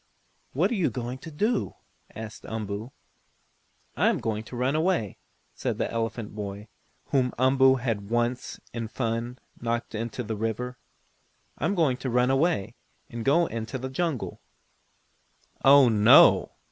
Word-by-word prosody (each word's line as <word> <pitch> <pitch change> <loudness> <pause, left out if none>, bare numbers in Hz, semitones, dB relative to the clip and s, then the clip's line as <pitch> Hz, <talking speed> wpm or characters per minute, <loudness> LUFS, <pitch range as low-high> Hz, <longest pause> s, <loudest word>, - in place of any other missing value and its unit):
"What - - +1
are - - +1
you 185 -7 +1
going 125 +1 -5
to 165 - -9
do?" 210 +9 -1 0.4
asked 110 -1 -8
Umboo. 110 +1 -5 1.0
"I - - +2
am - - +1
going 110 -1 -2
to 125 - -9
run 130 +4 0
away," 160 - 0 0.3
said - - -3
the - - -2
elephant 115 -2 -3
boy, 105 0 -6 0.4
whom 130 -2 +1
Umboo 130 +1 +5
had 115 -6 -3
once, 120 +1 -1
in 115 -1 -3
fun, 115 +1 -3 0.2
knocked 115 0 -2
into 115 +2 -4
the 110 0 -4
river. 115 +4 -3 0.8
"I - - -1
am 200 - +1
going 150 -8 +2
to 130 0 -4
run 125 +2 +2
away, 135 - +1 0.4
and 115 -1 -5
go 145 +7 +4
out - - -3
in 115 -1 -3
the 130 +2 -5
jungle." 150 -1 -3 1.2
"Oh, 135 0 +8
no. 105 -2 +6
120 Hz, 150 wpm, -26 LUFS, 110-135 Hz, 1.2 s, Oh